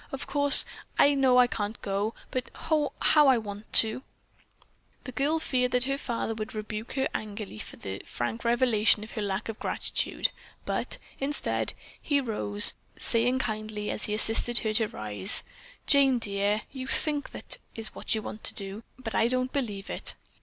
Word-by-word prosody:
Of 270 - -5
course 285 +1 +7 0.3
I 285 - +5
know 265 -2 +3
I 250 - +7
can't 220 -2 -4
go, 200 +2 -2 0.2
but, 255 -1 -4 0.2
oh, 300 -2 +2
how 300 -2 +5
I 265 - +6
do 230 - -2
want 205 0 -9
to." 220 +3 +6 1.0
The 255 - -8
girl 290 +5 0
feared 255 -5 -1
that 250 0 +2
her 275 +1 -2
father 235 -4 -3
would 220 +2 -7
rebuke 215 +1 -6
her 265 0 0
angrily 205 - -6
for - - -8
the 95 0 -7
frank 175 - -5
revelation 235 -3 +2
of 215 - -11
her 220 - -5
lack 200 0 -3
of 225 -1 -7
gratitude, - - -1 0.3
but, - - -2 0.2
instead, 285 +2 -1 0.3
he 285 -2 +1
rose, 210 -4 +3 0.2
saying 245 +2 +1
kindly 215 -3 -4
as - - -3
he 210 - -2
assisted 225 +2 +7
her 215 - 0
to 220 0 +2
arise, 105 - +3 0.4
"Jane, 275 -3 +4
dear, 205 -1 -1
you 260 -1 -7
think 295 0 -1
that - - -9 0.2
is 225 -1 -4
what - - -1
you 215 - -4
want 215 - -8
to - - +1
do 195 +1 -3 0.2
but 230 -4 -7
I 225 - +2
don't 255 +1 -2
believe 210 -8 -3
it. - - -3
225 Hz, 180 wpm, -27 LUFS, 210-260 Hz, 1.0 s, course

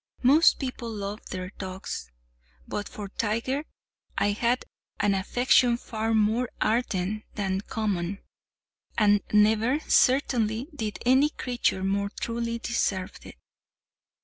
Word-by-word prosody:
Most 295 +6 +6
people 250 -3 -4
love 205 -1 -5
their 185 0 -5
dogs—but - - -7
for 205 -1 -7
Tiger 230 +8 -1 0.5
I 205 - +2
had 235 +4 0 0.3
an 205 - +3
affection 240 +4 +3
far 225 -1 -2
more 220 +3 +2
ardent 215 -3 0
than 195 -2 -1
common; 200 -4 -2 0.8
and 205 -2 +4
never, 220 +6 +4
certainly, 250 -3 +2
did 220 -7 -4
any 265 +4 +5
creature 245 -9 -1
more 200 +1 0
truly 235 0 -2
deserve 200 -5 -2
it. - - -12
215 Hz, 110 wpm, -27 LUFS, 195-240 Hz, 0.8 s, Most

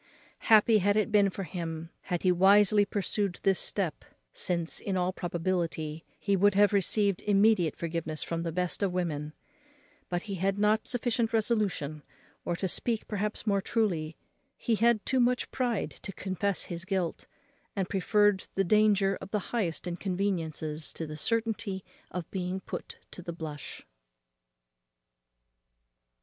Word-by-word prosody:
Happy 220 0 +7
had 205 +2 +2
it 215 - +1
been 205 -2 +5
for 195 +1 -5
him, 165 -1 -5
had 175 -3 -2
he 185 - +5
wisely 200 +3 +5
pursued 200 -1 -1
this 195 -2 +3
step; 185 -6 -2 0.3
since, 170 -2 0
in 195 -2 -2
all 180 +1 0
probability, 165 -3 -2
he 200 -1 +1
would 200 +1 +4
have 205 +1 +5
received 200 0 +2
immediate 205 -5 +3
forgiveness 165 -2 -3
from 165 0 -3
the 170 -1 -2
best 180 +3 -1
of 195 -2 +1
women; 155 -5 -2 0.8
but 175 0 -1
he 205 - -5
had 195 +1 +1
not 210 +1 +2
sufficient 235 -2 0
resolution, 210 -10 0 0.4
or, 175 - 0
to 190 - -2
speak 225 +5 -1
perhaps 210 +1 -3
more 200 -2 +2
truly, 175 -8 -1 0.4
he 235 - 0
had 225 0 +3
too 260 - +1
much 245 0 +2
pride, 245 -5 -1
to 195 - -8
confess 190 +1 -2
his 170 -1 -6
guilt, 180 -2 -2 0.5
and 190 -3 -1
preferred 205 0 +2
the 195 - +3
danger 200 0 +3
of - - -8
the 210 -2 -3
highest 185 -10 -1
inconveniences 170 -4 -2
to 165 - -4
the 155 0 -7
certainty 215 0 -1 0.2
of 180 -3 -5
being 185 0 -2
put - - -7
to - - -8
the 170 - -5
blush. 155 -3 -7
195 Hz, 150 wpm, -29 LUFS, 170-210 Hz, 0.8 s, Happy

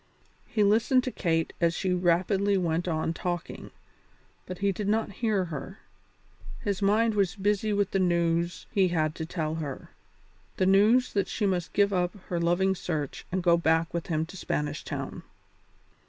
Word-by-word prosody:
He 215 - +1
listened 225 +5 +3
to 255 - -3
Kate 165 -6 -1
as 170 -1 +2
she 185 +1 0
rapidly 185 +3 +2
went 170 -1 -1
on 160 -1 -1
talking, 175 0 -4 0.8
but 185 - -6
he 200 +1 +1
did 200 +2 -4
not 215 0 +1
hear 210 -5 +1
her; 155 -5 -7 0.8
his 200 -1 -2
mind 215 +3 +3
was 195 -4 +1
busy 205 +1 0
with 205 -1 +1
the 195 - +1
news 170 -1 +1
he 195 -4 +3
had 155 -3 0
to 160 -1 -6
tell 160 -3 -2
her 140 -4 -7 0.7
the 185 - +2
news 215 +7 +4
that 200 -2 +1
she 210 - -2
must 180 -3 -1
give 200 -1 +3
up 180 0 0
her 175 - -1
loving 175 +3 +2
search 155 -6 -4
and 185 0 -1
go 170 -1 +5
back 165 0 +1
with 170 -1 -3
him 160 -1 0
to 175 - -12
Spanish 150 -4 -3
Town. - - -5
180 Hz, 170 wpm, -28 LUFS, 170-200 Hz, 0.8 s, go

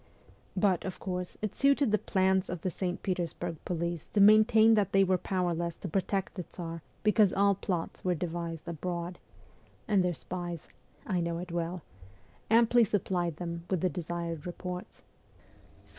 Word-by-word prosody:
But, 185 -2 +2
of 190 - -5
course, 180 -1 -4
it 215 - -2
suited 275 -3 +3
the 215 - +3
plans 190 0 +1
of 180 -3 -4
the 185 - -1
St. 180 0 -3
Petersburg 175 -3 -2
police 170 -1 -2
to 210 - +2
maintain 215 +2 +7
that 210 -4 +2
they 195 0 +6
were 185 -1 +2
powerless 175 -2 -1
to - - -7
protect 195 +2 -1
the 185 - -4
Tsar 165 -1 -7 0.2
because 210 -2 +4
all 200 +1 +4
plots 180 -3 -3
were 180 -1 +1
devised 170 -1 -4
abroad, 175 +1 -4 0.7
and 200 -3 +3
their 180 -1 0
spies 175 +3 -6 0.4
I 185 -4 0
know 170 0 -1
it 175 0 -6
well 170 0 -3 0.7
amply 235 +1 +5
supplied 180 -5 0
them 170 0 -5
with 185 -4 0
the 185 - +2
desired 170 -2 -4
reports. 180 0 -7
180 Hz, 160 wpm, -30 LUFS, 170-195 Hz, 0.7 s, maintain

